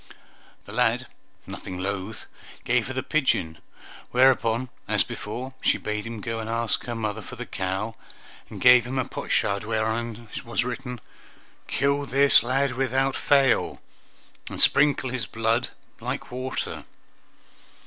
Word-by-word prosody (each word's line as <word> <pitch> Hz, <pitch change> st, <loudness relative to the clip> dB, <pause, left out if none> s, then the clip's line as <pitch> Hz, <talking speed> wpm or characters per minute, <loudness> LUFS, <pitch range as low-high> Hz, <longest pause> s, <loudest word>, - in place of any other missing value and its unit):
The -, -, -10 dB
lad, -, -, +2 dB, 0.4 s
nothing 90 Hz, -, -7 dB
loth, 100 Hz, +3 st, -4 dB, 0.4 s
gave 120 Hz, -1 st, +1 dB
her 130 Hz, -, -4 dB
the 130 Hz, -, -1 dB
pigeon; 95 Hz, -, +1 dB, 0.5 s
whereupon, 125 Hz, -1 st, +3 dB, 0.2 s
as -, -, +3 dB
before, 125 Hz, +5 st, -6 dB
she -, -, +3 dB
bade 105 Hz, +1 st, -3 dB
him 115 Hz, -2 st, -6 dB
go 115 Hz, 0 st, -3 dB
and 110 Hz, 0 st, -5 dB
ask 115 Hz, -1 st, -1 dB
her 120 Hz, -, -3 dB
mother 110 Hz, -1 st, -3 dB
for -, -, -9 dB
the -, -, -6 dB
cow, 95 Hz, +4 st, -3 dB, 0.6 s
and -, -, -8 dB
gave 125 Hz, -1 st, +7 dB
him 130 Hz, +2 st, -3 dB
a 130 Hz, -, +1 dB
potsherd 100 Hz, 0 st, 0 dB
where 110 Hz, 0 st, 0 dB
on 115 Hz, 0 st, -3 dB, 0.2 s
was 120 Hz, 0 st, -1 dB
written, 125 Hz, -1 st, -5 dB, 0.7 s
"Kill 140 Hz, +1 st, +1 dB
this 140 Hz, +2 st, +6 dB
lad 130 Hz, +3 st, +1 dB
without 135 Hz, +1 st, +1 dB
fail, 135 Hz, -3 st, +3 dB, 0.7 s
and -, -, -6 dB
sprinkle 140 Hz, -3 st, +4 dB
his 125 Hz, -4 st, -2 dB
blood 115 Hz, +2 st, 0 dB, 0.3 s
like -, -, -4 dB
water!" 130 Hz, +1 st, -4 dB
120 Hz, 140 wpm, -25 LUFS, 110-130 Hz, 0.7 s, gave